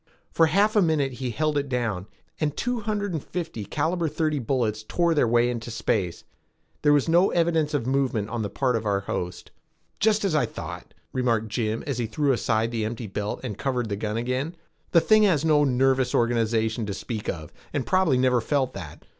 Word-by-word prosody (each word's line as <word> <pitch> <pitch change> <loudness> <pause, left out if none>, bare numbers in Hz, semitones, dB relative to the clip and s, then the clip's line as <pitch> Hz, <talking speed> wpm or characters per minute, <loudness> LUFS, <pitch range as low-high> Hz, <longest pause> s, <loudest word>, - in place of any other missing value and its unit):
For 165 - +4
half 200 +7 +3
a 210 - +6
minute 155 -6 +2
he 125 0 -4
held 150 +4 0
it 140 -1 -4
down, 115 -7 -2 0.3
and 150 -2 -1
two 245 0 -1
hundred 205 -3 -2
and 155 - -3
fifty 165 -11 -5
caliber 165 - -1
thirty 155 -1 0
bullets 115 -4 -1
tore 170 +9 +1
their 145 -6 +3
way 120 +1 +3
into 120 -1 -3
space. 100 -6 -1 0.6
There 145 - +4
was 145 0 +3
no 175 +4 +4
evidence 165 -3 +1
of 135 - -1
movement 130 -5 0
on 120 -1 -2
the 105 - -2
part 130 +1 0
of 115 - -1
our 100 -1 +1
host. 90 -2 -5 0.5
"Just 215 -1 +3
as 190 - +1
I 145 -6 +2
thought," - - -8 0.2
remarked 115 -4 0
Jim 110 0 -1
as 135 -4 -2
he 120 - -1
threw 140 +6 +1
aside 115 -2 +1
the 115 -2 -1
empty 115 +2 -4
belt 105 +1 -4
and 105 - -5
covered 125 -4 -1
the 100 - -1
gun 105 +2 -3
again. 130 +8 -2 0.3
"The 170 - +5
thing 215 +4 +5
has 170 -8 +3
no 150 -2 +4
nervous 130 -1 +2
organization 115 -1 +1
to 100 - -3
speak 110 0 -5
of 80 -3 -5 0.2
and 145 - -2
probably 185 -8 +3
never 125 -1 +3
felt 130 +1 0
that. 85 -6 -9
130 Hz, 205 wpm, -25 LUFS, 110-155 Hz, 0.6 s, a